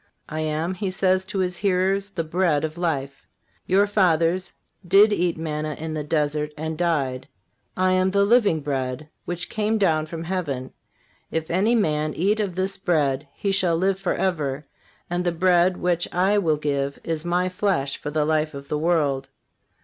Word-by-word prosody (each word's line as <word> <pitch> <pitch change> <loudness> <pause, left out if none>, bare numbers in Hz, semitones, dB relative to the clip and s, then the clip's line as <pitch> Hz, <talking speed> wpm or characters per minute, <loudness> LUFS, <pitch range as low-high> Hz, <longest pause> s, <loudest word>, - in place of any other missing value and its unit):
"I 155 - -4
am," 155 +3 -1
He 190 +1 -3
says 185 0 +1
to 195 +1 -5
His 180 -1 0
hearers, 195 0 +1
"the 175 -4 -3
bread 160 -2 +1
of 155 0 -3
life. 140 -6 -3 0.4
Your 195 +2 +4
fathers 180 -2 +2 0.3
did 200 +4 +5
eat 175 -3 0
manna 155 -1 -3
in 160 +2 -5
the 155 -1 -3
desert 150 0 -1
and 160 +1 -3
died.... 140 -6 -1 0.5
I 185 0 +3
am 185 0 +3
the 200 +1 +3
living 205 -8 +3
bread 135 +1 -3 0.2
which 175 0 -4
came 215 +1 0
down 155 -6 +2
from 165 +1 -6
heaven. 155 -8 -3 0.6
If 160 0 -3
any 205 +7 +3
man 155 -7 0
eat 205 +6 +1
of 200 -5 -2
this 190 +1 -1
bread 145 -6 +1
he 200 - -1
shall 180 -3 +2
live 190 +2 +1
forever, 155 -7 -1 0.4
and 175 +1 -1
the 175 - +1
bread 180 +1 +3
which 175 -1 0
I 195 +4 +2
will 160 -6 +1
give 140 -2 -2
is 165 -1 -2
My 175 +1 +1
flesh 185 -7 0
for - - -5
the 150 0 0
life 155 -1 0
of 140 0 -9
the 150 - -1
world. 145 -5 +1
170 Hz, 175 wpm, -24 LUFS, 150-185 Hz, 0.6 s, did